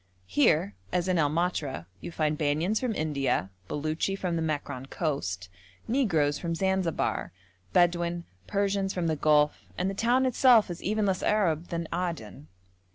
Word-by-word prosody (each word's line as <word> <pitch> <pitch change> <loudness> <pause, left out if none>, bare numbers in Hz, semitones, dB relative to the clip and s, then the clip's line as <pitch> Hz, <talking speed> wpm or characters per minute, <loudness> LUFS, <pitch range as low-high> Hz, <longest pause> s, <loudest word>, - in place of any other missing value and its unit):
Here, 145 - +3 0.2
as 180 0 0
in 180 -2 +2
El 145 -2 +3
Matra, 150 - -1
you 170 - -7
find 155 -2 0
Banyans 155 +8 +1
from 245 -4 -1
India, 140 - 0 0.2
Beluchi 155 +6 -1
from 180 -3 -2
the 165 - -1
Mekran 145 -4 -3
coast, 95 - -2 0.4
negroes 170 - +2
from 165 -1 -2
Zanzibar, 190 -1 0 0.4
Bedouin, 175 0 +2 0.2
Persians 195 - 0
from 180 -2 -1
the 160 -1 +1
Gulf, 150 0 +3 0.2
and 185 +2 0
the - - -5
town 240 +6 +2
itself 245 -5 +5
is 175 - -7
even 215 +1 0
less 190 -2 0
Arab 175 -6 +1
than 170 -1 -3
Aden. 165 -7 -4
170 Hz, 155 wpm, -28 LUFS, 150-190 Hz, 0.4 s, itself